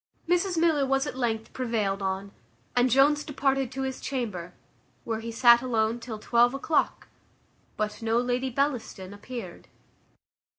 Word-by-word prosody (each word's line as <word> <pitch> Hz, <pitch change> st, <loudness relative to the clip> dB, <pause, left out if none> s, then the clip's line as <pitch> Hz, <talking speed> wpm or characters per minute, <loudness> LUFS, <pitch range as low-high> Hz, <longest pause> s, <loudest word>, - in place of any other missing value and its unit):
Mrs 355 Hz, +1 st, +1 dB
Miller 320 Hz, -4 st, +3 dB
was 270 Hz, +1 st, +1 dB
at 290 Hz, -, -5 dB
length 225 Hz, -3 st, -2 dB
prevailed 215 Hz, -6 st, -1 dB
on, 195 Hz, +1 st, -3 dB, 0.4 s
and 245 Hz, +1 st, +4 dB
Jones 285 Hz, +4 st, +4 dB
departed 270 Hz, -3 st, 0 dB
to 270 Hz, 0 st, -3 dB
his 265 Hz, -1 st, -4 dB
chamber, 205 Hz, -10 st, -4 dB, 0.5 s
where 225 Hz, -1 st, -3 dB
he 230 Hz, +1 st, -6 dB
sat 235 Hz, 0 st, +6 dB
alone 230 Hz, -2 st, 0 dB
till 235 Hz, -2 st, -6 dB
twelve 240 Hz, +3 st, +3 dB
o'clock, 300 Hz, +3 st, 0 dB, 0.7 s
but 210 Hz, +1 st, -3 dB
no 225 Hz, 0 st, +1 dB
Lady 250 Hz, +2 st, 0 dB
Bellaston 245 Hz, -8 st, -2 dB
appeared. 205 Hz, -3 st, -8 dB
245 Hz, 140 wpm, -27 LUFS, 220-270 Hz, 0.7 s, sat